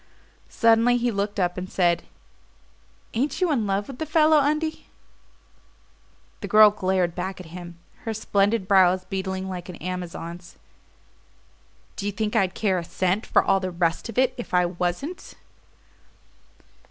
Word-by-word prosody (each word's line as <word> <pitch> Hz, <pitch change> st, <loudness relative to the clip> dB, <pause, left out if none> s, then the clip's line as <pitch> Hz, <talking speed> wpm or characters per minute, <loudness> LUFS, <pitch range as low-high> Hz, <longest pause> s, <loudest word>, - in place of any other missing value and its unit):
Suddenly 230 Hz, +1 st, +4 dB
he 240 Hz, 0 st, 0 dB
looked 205 Hz, 0 st, -2 dB
up 180 Hz, 0 st, 0 dB
and 185 Hz, 0 st, -7 dB
said: 175 Hz, -2 st, +1 dB, 1.1 s
"Ain't 265 Hz, +5 st, -1 dB
you 365 Hz, -3 st, +2 dB
in 230 Hz, -8 st, 0 dB
love 195 Hz, +1 st, -1 dB
with 265 Hz, -2 st, -9 dB
the 315 Hz, -, -3 dB
fellow, 310 Hz, 0 st, +4 dB
Undie?" 305 Hz, +2 st, -1 dB, 1.5 s
The -, -, -6 dB
girl 215 Hz, -1 st, +7 dB
glared 185 Hz, -3 st, 0 dB
back 185 Hz, +2 st, -5 dB
at 185 Hz, -, -9 dB
him, 175 Hz, -1 st, -9 dB, 0.3 s
her 225 Hz, -, -2 dB
splendid 205 Hz, -1 st, +1 dB
brows 185 Hz, -1 st, +4 dB
beetling 190 Hz, 0 st, -4 dB
like 180 Hz, -1 st, -6 dB
an 180 Hz, -, -7 dB
Amazon's. 175 Hz, 0 st, -7 dB, 1.4 s
"Do 200 Hz, -, -3 dB
you -, -, 0 dB
think 215 Hz, +2 st, -3 dB
I'd 190 Hz, -4 st, +1 dB
care 190 Hz, -4 st, +1 dB
a -, -, -5 dB
cent 185 Hz, +4 st, -1 dB
for -, -, +3 dB
all 195 Hz, -, +2 dB
the 185 Hz, -1 st, -3 dB
rest 170 Hz, +3 st, -1 dB
of 230 Hz, -, -8 dB
it 255 Hz, 0 st, +3 dB
if 240 Hz, -6 st, -4 dB
I 180 Hz, 0 st, +4 dB
wasn't?" 180 Hz, -, -4 dB
195 Hz, 155 wpm, -24 LUFS, 180-230 Hz, 1.5 s, girl